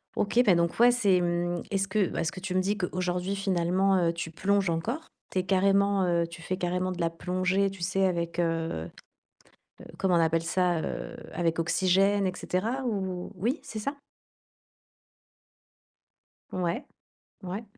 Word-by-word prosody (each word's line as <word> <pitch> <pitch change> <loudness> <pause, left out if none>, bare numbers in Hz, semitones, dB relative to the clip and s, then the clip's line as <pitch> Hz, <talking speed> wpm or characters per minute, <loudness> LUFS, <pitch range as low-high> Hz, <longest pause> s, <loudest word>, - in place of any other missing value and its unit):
OK, 230 +4 +3
bah 190 -5 +6
donc 170 0 +1
ouais, 245 +1 +7
c'est 200 -7 +3
mmh, 175 0 -1
est-ce 195 -1 +1
que 205 -3 +1
bah 165 - -2
ce 165 - -1
que 190 - -8
tu 185 -1 -3
me - - +4
dis 200 +2 0
qu'aujourd'hui, 180 0 -2
finalement, 190 0 +2
heu, 165 - +1
tu 165 -1 -5
plonges 200 +2 +1
encore. 225 - -2 0.2
Tu 185 - 0
es - - 0
carrément, 195 +1 +3
heu, 170 -1 +1
tu 170 0 -11
fais 185 +3 -3
carrément 180 +1 -1
de 180 - -6
la 165 - +2
plongée, 185 +3 0
tu 195 -2 -11
sais, 185 +2 +1
avec, 170 -2 -1
heu, 165 - -1 0.9
heu, - - -10
comment 190 -2 +2
on - - +4
appelle 165 0 +2
ça, 175 -1 +1
heu, - - -5 0.2
avec 165 -1 0
oxygène, 195 +4 +3
et 185 - 0
cetera 230 +9 -2
ou? 190 -5 -3
Oui, 235 - -1
c'est 215 - -6
ça? 280 +7 -3 2.6
Ouais, 180 - -1 0.6
ouais. 190 +5 -4
185 Hz, 170 wpm, -28 LUFS, 170-195 Hz, 2.6 s, ouais